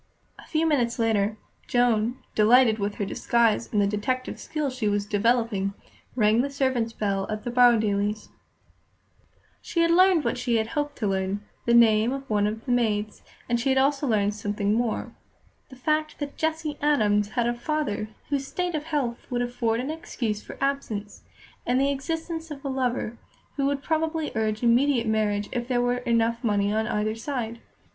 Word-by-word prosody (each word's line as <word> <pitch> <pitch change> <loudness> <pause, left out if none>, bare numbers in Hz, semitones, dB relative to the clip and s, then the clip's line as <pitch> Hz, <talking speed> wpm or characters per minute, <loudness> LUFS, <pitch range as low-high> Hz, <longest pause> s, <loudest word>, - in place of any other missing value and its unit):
A - - -14
few 320 0 +1
minutes 250 -7 +1
later, 220 -2 +1 0.3
Joan, 240 -1 +2 0.2
delighted 225 +1 +5
with 205 0 -2
her 205 - -2
disguise 230 +2 +1
and 210 - +1
the 200 - +4
detective 215 +6 -2
skill 300 -3 -3
she 255 -4 -2
was 205 0 0
developing, 210 -2 +1 0.4
rang 220 -1 +4
the 280 - -2
servants' 260 -5 0
bell 200 -3 -1
at 215 0 -4
the 240 - -3
Borrowdailes'. 215 -4 +3 1.3
She 335 - -1
had 335 0 +3
learned 365 -2 +5
what - - -1
she 240 -2 0
had 220 0 0
hoped 295 -2 -2
to 215 - -1
learn, 195 +1 -1 0.2
the 235 - +5
name 225 0 +5
of 275 0 -6
one 210 -2 +2
of 220 +2 -5
the 255 - -2
maids, 215 -3 0 0.3
and 240 0 +1
she 250 - 0
had 265 - +3
also 275 +1 +2
learned 210 -3 +2
something 205 0 -1
more 230 -1 -1 0.6
the 260 - -12
fact 305 +4 -1
that 285 -1 -5
Jessie 315 -2 -2
Adams 210 -9 +2
had 240 - +3
a 240 - +1
father 240 -5 -2 0.2
whose 275 -2 -1
state 360 +2 -2
of 305 -1 -3
health 280 -7 -2
would 245 -1 0
afford 235 -2 -1
an 265 +5 -2
excuse 235 -9 -3
for - - -10
absence; 255 -7 -3 0.4
and 250 +1 +1
the 275 +1 +2
existence 325 +3 -4
of 285 -2 -8
a - - -1
lover, 250 -3 -2 0.4
who 275 -1 +1
would 280 0 -1
probably 320 -1 -1
urge 220 0 -1
immediate 240 +1 +3
marriage 210 -2 0
if 240 -1 -3
there 250 -2 +1
were 245 0 +1
enough 235 -1 0
money 205 -2 +1
on 220 0 0
either 210 +1 0
side. 230 -1 -4
235 Hz, 180 wpm, -26 LUFS, 215-275 Hz, 1.3 s, delighted